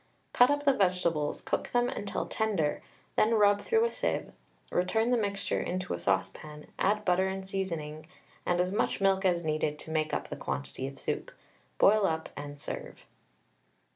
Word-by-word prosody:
Cut 245 +1 +6
up 290 0 0
the 280 - +6
vegetables, 180 - +1
cook - - -2
them 245 0 +3
until 205 -4 -3
tender, 200 -9 0 0.3
then 225 +2 +4
rub 205 -1 +4
through 450 - +3
a 470 - 0
sieve, - - -2 0.4
return 220 +6 +1
the - - +5
mixture 200 -3 -1
into 185 0 -3
a - - -3
saucepan, 150 0 -2
add 210 +2 +2
butter 185 +1 +3
and 190 0 -4
seasoning, 165 -6 -4 0.4
and 175 0 +1
as 180 +1 +1
much 205 - 0
milk 195 0 +2
as 175 -2 +2
needed 155 -1 0
to 160 - -9
make 155 -1 0
up - - -2
the - - -4
quantity 65 - -4
of 135 - -9
soup. - - -3 0.5
Boil 205 0 +5
up 160 0 -2
and 145 0 -7
serve. - - -7
185 Hz, 170 wpm, -30 LUFS, 155-210 Hz, 0.5 s, Cut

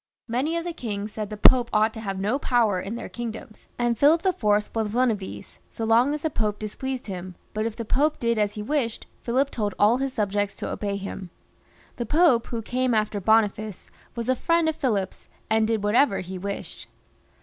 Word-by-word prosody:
Many 265 +8 0
of 335 - -2
the 345 0 -4
kings 210 -7 -4
said 210 -1 -4
the 210 - -6
Pope 240 +3 +6
ought 215 +1 +3
to 220 - -7
have 195 -3 -4
no 215 +8 0
power 225 -9 +2
in 200 +5 -5
their 235 - -6
kingdoms, 225 -2 -7
and 240 -1 +1
Philip 320 +5 +5
IV. 375 -2 0
was 210 0 +3
one 230 +3 +1
of 210 - -2
these, 190 - -9
so 225 - -4
long 235 +5 +4
as 300 - -6
the 315 - -1
Pope 210 -4 -1
displeased 255 +5 -5
him, 185 -2 -6 0.2
but 215 +1 -1
if 225 - -5
the 230 - -5
Pope 295 +7 +2
did 235 -2 0
as 205 -1 +1
he 210 - -5
wished, 255 -3 -1 0.2
Philip 265 +4 +1
told 205 -4 -2
all 215 +4 +5
his 270 0 -1
subjects 205 -3 -1
to - - -5
obey 200 -1 -2
him. 195 -2 -6 0.7
The 240 -2 -3
Pope 300 -6 +4
who 230 -2 -4
came 255 +1 0
after 215 -1 0
Boniface 215 -1 +1 0.2
was 235 -1 -4
a 260 - +3
friend 335 +4 +2
of 315 - +1
Philip's, 205 -10 -2 0.2
and 220 0 +3
did 220 -2 0
whatever 210 +2 +3
he 185 +1 -7
wished. 200 +1 -6
225 Hz, 210 wpm, -25 LUFS, 205-255 Hz, 0.7 s, Pope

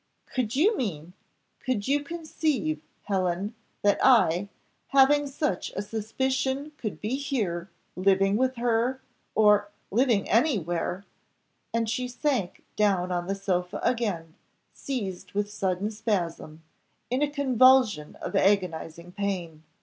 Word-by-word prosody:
Could 245 -2 -1
you 390 - +4
mean 175 - -4 0.5
could 245 -6 -2
you 285 +1 +2
conceive, 295 - -2 0.2
Helen, 190 +1 -1 0.3
that 205 -1 +3
I, 200 -7 +4 0.4
having 280 +2 +5
such 275 - -2
a 195 - -2
suspicion 265 +7 -2
could 215 -4 -5
be 225 +6 -2
here 200 -11 -2 0.3
living 195 +1 +3
with 260 +3 +1
her 240 +2 +1 0.4
or 210 -1 +5 0.2
living 230 -2 +2
anywhere 195 - 0 0.3
" - - -46
And 230 -1 0
she 250 +3 -1
sank 250 - -2
down 195 -4 +2
on 175 0 -2
the 195 - -1
sofa 180 -2 -2
again, 195 -10 -1 0.4
seized 200 -10 -5
with 205 +1 -1
sudden 195 +1 -1
spasm 170 -7 -3 0.5
in 255 +3 +1
a 295 - +2
convulsion 255 - +4
of - - -4
agonising 175 -3 0
pain. 180 -5 -3
210 Hz, 125 wpm, -27 LUFS, 185-260 Hz, 0.5 s, having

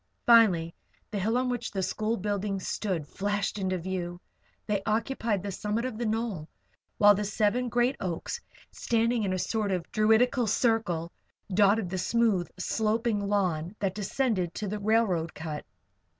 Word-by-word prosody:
Finally 190 -9 +5 0.4
the 205 - -2
hill 220 +5 +1
on 255 0 +1
which 245 -2 -2
the 195 -2 -2
school 215 +4 -1
buildings 200 -1 -2
stood 180 -8 -2
flashed 205 +2 -2
into 185 -1 0
view. 175 0 -4 0.5
They 205 -2 0
occupied 225 -2 -1
the 200 - -3
summit 210 +5 -2
of 240 -4 -4
the 240 - -1
knoll, 215 -8 -2 0.5
while 205 0 +7
the 205 +1 -1
seven 215 +4 +1
great 245 +3 +2
oaks, 185 - -4 0.3
standing 230 0 +1
in 200 -3 0
a 185 - 0
sort 210 +2 -1
of 180 -3 -3
druidical 225 +3 +3
circle, 205 -7 +1 0.4
dotted 200 -1 +3
the 190 - -2
smooth, 210 -2 +1
sloping 220 +3 0
lawn 190 -4 -1
that 195 -2 -1
descended 205 -3 -1
to 210 - -3
the 210 +2 -3
railroad 200 -6 +1
cut. 155 -1 -5
205 Hz, 155 wpm, -28 LUFS, 185-225 Hz, 0.5 s, while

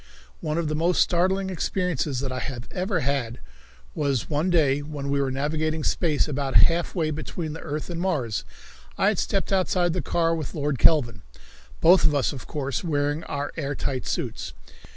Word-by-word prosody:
One 155 +1 -2
of 170 -2 0
the 155 - -1
most 170 +3 +1
startling 190 +2 +2
experiences 165 -7 -1
that 135 -2 -3
I 130 - -3
have 125 -2 -5
ever 185 -2 -1
had 130 -4 -1 0.5
was 140 -3 -1
one 155 +5 +1
day 145 -5 +3
when 145 -1 -5
we 140 0 +2
were 135 - 0
navigating 155 +3 -1
space 155 -3 +1
about 140 -2 -2
half 170 +3 0
way 160 -3 0
between 155 +1 -4
the 160 - -7
earth 150 -1 -4
and 170 -1 -4
Mars. 135 - -1 0.5
I 195 - +4
had 210 - 0
stepped 195 0 -1
outside 180 -2 +2
the 180 - -1
car 165 -1 +1
with 160 -4 -4
Lord 145 -4 -1
Kelvin, 120 - +4 0.6
both 180 +3 +6
of 150 -2 +4
us, 140 - +1
of 135 - -9
course, 140 -4 -3
wearing 145 -1 0
our 145 0 -3
air 145 -2 -2
tight 130 -2 -3
suits. - - -3
155 Hz, 185 wpm, -25 LUFS, 140-170 Hz, 0.6 s, both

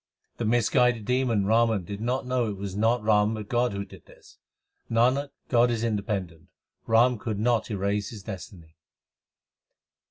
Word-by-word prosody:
The 115 - -2
misguided 120 0 +2
demon 125 -5 +1
Raw 115 +3 +3
an 105 -5 -1
did 100 +4 -7
not 125 +3 -1
know 125 -3 0
it 100 - -5
was 95 -1 -6
not 115 +2 +1
Ram 105 0 +3
but 105 -1 -7
God 120 +1 +1
who 100 0 -4
did - - -16
this. - - -19 0.5
Nanak, 125 +5 +2 0.2
God 120 -1 +3
is 115 -1 -1
independent: 100 -6 -3 0.4
Ram 115 +1 +4
could 110 -2 -3
not 115 +1 +1
erase 100 0 -1
his 105 -4 -10
destiny. 90 -5 -10
110 Hz, 160 wpm, -26 LUFS, 100-120 Hz, 0.5 s, Ram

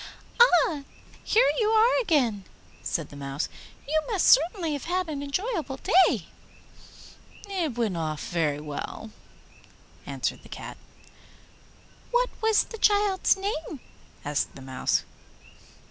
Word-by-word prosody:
'Ah, 350 -10 +5 0.4
here 465 +4 +4
you 430 -2 +2
are 450 +3 +4
again!' 250 - +1 0.4
said 165 -5 -3
the - - -12
Mouse; 140 +1 -4 0.4
'you 310 +2 +2
must 415 -7 +1
certainly 330 +2 +4
have 285 - -5
had 365 +1 -1
an 295 -3 -4
enjoyable 305 - -3
day.' 370 +7 +3 1.2
'It 345 - -2
went 220 -6 0
off 155 -3 -3
very 155 -4 0
well,' 150 +8 -6 1.0
answered - - -3
the - - -16
Cat. - - -8 1.3
'What - - +1
was 445 -1 +4
the 450 - -10
child's 410 -2 +3
name?' 355 -7 -4 0.5
asked 145 0 -1
the 135 - -10
Mouse. 130 -1 0
315 Hz, 120 wpm, -26 LUFS, -, 1.3 s, Ah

